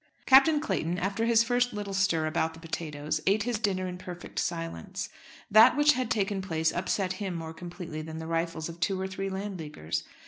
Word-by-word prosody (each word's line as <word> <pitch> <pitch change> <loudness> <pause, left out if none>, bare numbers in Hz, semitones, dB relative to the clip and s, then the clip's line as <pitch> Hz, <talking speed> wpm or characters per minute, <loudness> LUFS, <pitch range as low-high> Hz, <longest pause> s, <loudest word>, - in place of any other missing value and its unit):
Captain 275 +3 +7
Clayton, 175 - -1
after 200 +5 -1
his 230 -1 +5
first 245 0 +1
little 205 -1 -4
stir 190 -5 +2
about 160 0 0
the - - -12
potatoes, 155 -3 -3
ate 205 +2 +3
his 240 -1 -1
dinner 190 -4 0
in 180 0 -6
perfect 180 -1 -7
silence. 185 +4 -4 0.4
That 225 +6 +8
which 295 0 +6
had 255 -2 -2
taken 200 -2 0
place 160 -3 0
upset 185 +1 -1
him 190 -3 -2
more 160 -1 -5
completely 175 -2 -7
than 160 0 -7
the 160 - -5
rifles 165 -1 -2
of 170 0 -9
two 185 +3 0
or 190 - -2
three 190 +1 -4
Landleaguers. 175 - -4
185 Hz, 195 wpm, -29 LUFS, 165-210 Hz, 0.4 s, That